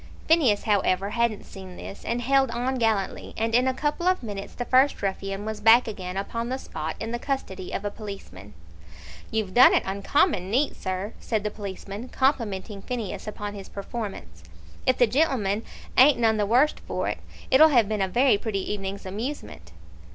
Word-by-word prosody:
Phineas, 280 -11 +4
however, 200 -2 +1
hadn't 235 -2 0
seen 190 -2 -10
this, 195 - -9
and 240 +1 -2
held 270 +1 +3
on 250 +2 -2
gallantly, 220 -4 -1
and 225 +1 -1
in 250 +2 +4
a 260 - +2
couple 300 +5 -1
of 370 -7 +2
minutes 200 -3 -6
the 245 - -4
first 260 +3 +4
ruffian 195 +1 -3
was 215 -1 -4
back 225 +3 +6
again 190 -4 -5
upon 230 +4 -3
the 260 - -1
spot 160 -11 -5
in 225 +1 -4
the 240 - -2
custody 215 -10 -4
of 205 - -4
a 205 - -1
policeman. 195 - -9 0.7
"You've 215 -4 -2
done 250 +2 +7
it - - +2
uncommon 195 - +1
neat, 265 +7 +1
sir," 190 +3 -4
said 220 -3 -2
the 210 - -2
policeman, 200 +2 -7
complimenting 215 -7 -1
Phineas 230 -3 -5
upon 205 -1 -5
his 200 -2 -9
performance. 195 - -7 0.4
"If 255 - +4
the 245 - +6
gen'leman 230 -6 +1 0.3
ain't 270 +2 +7
none 225 -2 +2
the 205 -1 +1
worst 255 +7 +3
for - - -3
it, - - -3 0.3
it'll 310 +4 +8
have 240 -8 +4
been 215 -1 -1
a 190 - +2
very 240 +2 +3
pretty 205 -3 -2
evening's 195 0 -5
amusement." 190 - -6
215 Hz, 180 wpm, -25 LUFS, 195-250 Hz, 0.7 s, it'll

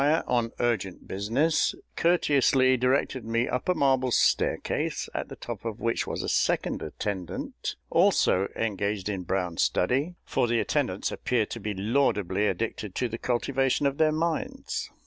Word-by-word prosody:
on 120 -2 0
urgent 105 -6 -1
business, 120 +12 +1 0.2
courteously 140 -6 +3
directed 130 0 +1
me 115 +2 0
up 125 +7 -2
a 180 - +3
marble 130 -3 +2
staircase, - - +1
at - - -4
the - - -7
top - - -7
of 115 -1 -4
which 115 0 -1
was - - -3
a - - -3
second - - +1
attendant, 95 -5 -4 0.2
also 95 +2 +3
engaged 100 -2 -1
in 100 -3 -2
brown 90 -2 -2
study 140 - +1
for 120 - +1
the 120 0 +1
attendants - - 0
appear 120 -4 0
to 115 - -7
be 105 -1 -4
laudably 105 -3 +1
addicted 105 0 -3
to 125 - 0
the 115 0 -6
cultivation 135 +3 0
of 140 0 0
their 155 -1 +4
minds. 160 +1 -2
115 Hz, 150 wpm, -27 LUFS, 100-135 Hz, 0.2 s, their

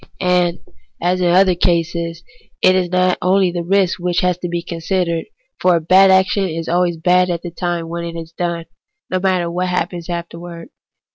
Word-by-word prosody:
185 - - -4
And, 180 - 0 0.4
as 185 0 -1
in 180 - +2
other 185 +2 +5
such 175 - -3
cases, 170 -1 0 0.4
it 185 - +6
is 185 -1 0
not 185 0 +1
the 180 -2 +1
risk 190 +1 +1
only - - -10
which 180 0 +1
has 180 -1 +1
to 175 - -4
be 170 0 -3
considered; 170 0 -2 0.3
for 180 -1 +3
a - - +2
bad 185 +4 +5
action 190 +1 +3
is 165 0 -5
always 175 0 +1
bad 180 +2 +3
at 170 -1 -3
the 175 - -6
time 175 -1 -3
when 170 +1 -5
it 170 0 -5
is 165 0 -9
done, 170 -1 -3 0.5
no 185 - +1
matter 185 -2 0
what 180 +1 -1
happens 180 -1 -3
afterwards. 170 0 -7
175 Hz, 200 wpm, -18 LUFS, 170-185 Hz, 0.5 s, it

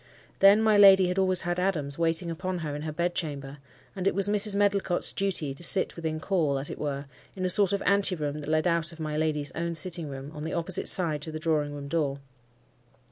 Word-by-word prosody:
Then 200 +3 +6
my 215 -2 +3
lady 190 -2 +7
had 180 +1 -1
always 185 -1 +2
Adams 175 -5 -2
waiting 165 +1 0
upon 185 +2 -4
her 145 -1 -4
in 150 - -6
her 155 0 -5
bed 175 +3 -2
chamber; 140 -4 -5 0.4
and 190 -1 -2
it - - +1
was 200 0 0
Mrs. 205 0 +3
Medlicott's 200 -3 +2
duty 180 -8 -2
to 170 - -7
sit 190 +2 +2
within 160 -2 -4
call, 155 -6 0
as 135 +2 +3
it - - -8
were, 140 -1 -4 0.3
in 185 -1 -3
a 180 - +1
sort 200 0 +2
of 200 - -2
anteroom 180 -7 +1
that 150 - -7
led 155 +1 +1
out 170 -2 +4
of 165 - -14
my 155 -1 -4
lady's 150 -2 -1
own 170 0 -4
sitting 165 -1 -2
room, 135 +1 -8
on 150 - -9
the 160 +2 -5
opposite 170 +2 -2
side 160 -5 +1
to 160 - -5
the 155 - -5
drawing 155 -2 -1
room 140 -1 -8
door. 145 -3 -1
165 Hz, 225 wpm, -27 LUFS, 150-190 Hz, 0.4 s, lady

